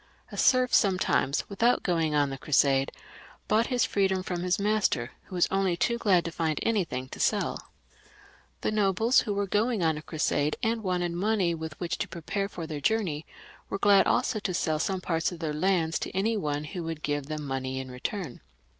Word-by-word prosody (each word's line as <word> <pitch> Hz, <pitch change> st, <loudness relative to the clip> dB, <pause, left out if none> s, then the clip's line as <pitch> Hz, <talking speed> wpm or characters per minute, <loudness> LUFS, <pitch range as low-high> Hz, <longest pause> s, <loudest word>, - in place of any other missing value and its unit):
A -, -, -7 dB
serf 255 Hz, -1 st, +3 dB
sometimes, 185 Hz, -, +2 dB
without 230 Hz, +5 st, +2 dB
going 165 Hz, -4 st, +1 dB
on 145 Hz, -2 st, +2 dB
the 135 Hz, -, -5 dB
Crusade, 135 Hz, -1 st, +2 dB, 0.6 s
bought 220 Hz, +2 st, +3 dB
his 250 Hz, -2 st, +2 dB
free 200 Hz, -1 st, +2 dB
dom 190 Hz, -1 st, -1 dB
from 175 Hz, -2 st, -3 dB
his 180 Hz, 0 st, +1 dB
master, 200 Hz, -, +1 dB
who 185 Hz, -, -9 dB
was 175 Hz, -, +3 dB
only 195 Hz, -3 st, +1 dB
too 235 Hz, +6 st, +1 dB
glad 185 Hz, -6 st, +3 dB
to 170 Hz, -, -3 dB
find 160 Hz, -2 st, -1 dB
any 220 Hz, -4 st, +2 dB
thing 130 Hz, -5 st, -5 dB
to -, -, -9 dB
sell -, -, 0 dB, 0.9 s
The -, -, 0 dB
nobles 215 Hz, +4 st, +3 dB
who 210 Hz, -, -1 dB
were 200 Hz, 0 st, 0 dB
going 210 Hz, +1 st, +1 dB
on 160 Hz, -2 st, +1 dB
a -, -, -10 dB
crusade, 150 Hz, -1 st, 0 dB
and 225 Hz, 0 st, +1 dB
wanted 180 Hz, -3 st, -1 dB
money 185 Hz, 0 st, +1 dB
with 160 Hz, -1 st, -6 dB
which 175 Hz, -2 st, -3 dB
to -, -, -1 dB
prepare 195 Hz, +4 st, -3 dB
for 170 Hz, -4 st, -6 dB
their 155 Hz, -2 st, -5 dB
journey, 185 Hz, -9 st, 0 dB, 0.4 s
were -, -, -2 dB
glad 200 Hz, -1 st, +5 dB
also 245 Hz, -3 st, +1 dB
to 185 Hz, -3 st, -2 dB
sell 155 Hz, -3 st, 0 dB
some 190 Hz, +3 st, -1 dB
part 165 Hz, -1 st, 0 dB
of 175 Hz, -, -7 dB
their 160 Hz, -2 st, -3 dB
lands 165 Hz, 0 st, +1 dB
to -, -, -4 dB
any 220 Hz, +4 st, +1 dB
one 150 Hz, -7 st, -2 dB
who 170 Hz, +3 st, -6 dB
would 160 Hz, -1 st, -5 dB
give 145 Hz, -2 st, -2 dB
them 155 Hz, -1 st, -4 dB
money 130 Hz, -1 st, -3 dB
in 130 Hz, -1 st, -7 dB
return. 150 Hz, -, -5 dB
175 Hz, 205 wpm, -28 LUFS, 155-205 Hz, 0.9 s, glad